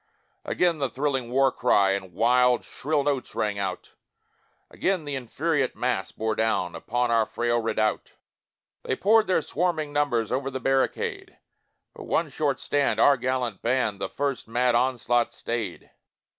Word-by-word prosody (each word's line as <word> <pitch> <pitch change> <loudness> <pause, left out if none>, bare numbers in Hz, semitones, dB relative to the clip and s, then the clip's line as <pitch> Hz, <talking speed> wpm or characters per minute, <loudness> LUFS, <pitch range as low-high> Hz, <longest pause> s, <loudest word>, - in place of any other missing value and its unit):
Again 175 -3 +1
the 135 -2 0
thrilling 135 -2 -2
war 135 +1 +3
cry 100 -7 +3
In 95 -3 -4
wild 125 +2 +3
shrill 150 0 -1
notes 140 -3 -2
rang 105 -1 -1
out, 95 -2 -4 0.8
Again 185 -5 -1
th' - - -6
infuriate 140 +2 -1
mass 125 -6 -1
bore 110 0 -2
down 110 -6 0
Upon 120 +1 -1
our 115 -1 +3
frail 120 0 0
redoubt; 110 -1 -1 0.7
They 130 - -2
poured 215 +6 +4
their 180 -4 +2
swarming 155 -3 -1
numbers 130 -7 0
Over 135 +2 -1
the 130 0 -4
barricade 135 +1 -1 0.6
But - - -10
one - - 0
short - - -1
stand, 145 -1 0
our 145 - +6
gallant 125 -4 -2
band 115 -5 0
That 95 - -2
first 140 -4 -2
mad 120 +2 +1
onslaught 120 -1 +1
stayed. 115 -6 -5
125 Hz, 150 wpm, -25 LUFS, 115-140 Hz, 0.8 s, our